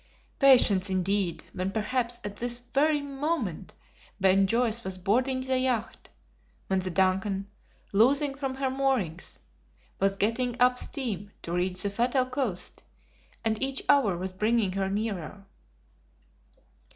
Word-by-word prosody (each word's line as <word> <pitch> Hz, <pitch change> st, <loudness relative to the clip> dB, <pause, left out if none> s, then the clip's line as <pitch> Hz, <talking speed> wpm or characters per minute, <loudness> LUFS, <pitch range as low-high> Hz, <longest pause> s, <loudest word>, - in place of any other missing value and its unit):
Patience, 230 Hz, -8 st, +5 dB
indeed, 190 Hz, -1 st, 0 dB
when 185 Hz, +1 st, -2 dB
perhaps 235 Hz, +3 st, -1 dB
at 205 Hz, 0 st, -6 dB
this 240 Hz, 0 st, -1 dB
very 285 Hz, +5 st, +1 dB
moment 275 Hz, -, -3 dB, 0.4 s
Ben 195 Hz, 0 st, +4 dB
Joyce 235 Hz, +1 st, +1 dB
was 190 Hz, -2 st, -4 dB
boarding 250 Hz, +8 st, +1 dB
the 260 Hz, 0 st, +1 dB
yacht; 250 Hz, -3 st, -1 dB, 0.6 s
when 190 Hz, -1 st, 0 dB
the 185 Hz, 0 st, -3 dB
DUNCAN, 190 Hz, +2 st, +1 dB, 0.5 s
loosing 275 Hz, +7 st, +4 dB
from 270 Hz, -1 st, -4 dB
her 265 Hz, -1 st, -1 dB
moorings, 260 Hz, -11 st, -1 dB, 0.6 s
was 195 Hz, 0 st, +2 dB
getting 240 Hz, +4 st, 0 dB
up 250 Hz, 0 st, +4 dB
steam 215 Hz, -, -3 dB
to 170 Hz, -, -6 dB
reach 180 Hz, +1 st, 0 dB
the 200 Hz, -, -1 dB
fatal 245 Hz, +5 st, +1 dB
coast, 255 Hz, -8 st, -3 dB, 0.6 s
and 220 Hz, -1 st, 0 dB
each 270 Hz, 0 st, -1 dB
hour 250 Hz, -11 st, +4 dB
was 185 Hz, +2 st, -3 dB
bringing 215 Hz, +1 st, +1 dB
her 195 Hz, 0 st, -1 dB
nearer. 200 Hz, -2 st, -4 dB
220 Hz, 130 wpm, -28 LUFS, 190-260 Hz, 0.6 s, Patience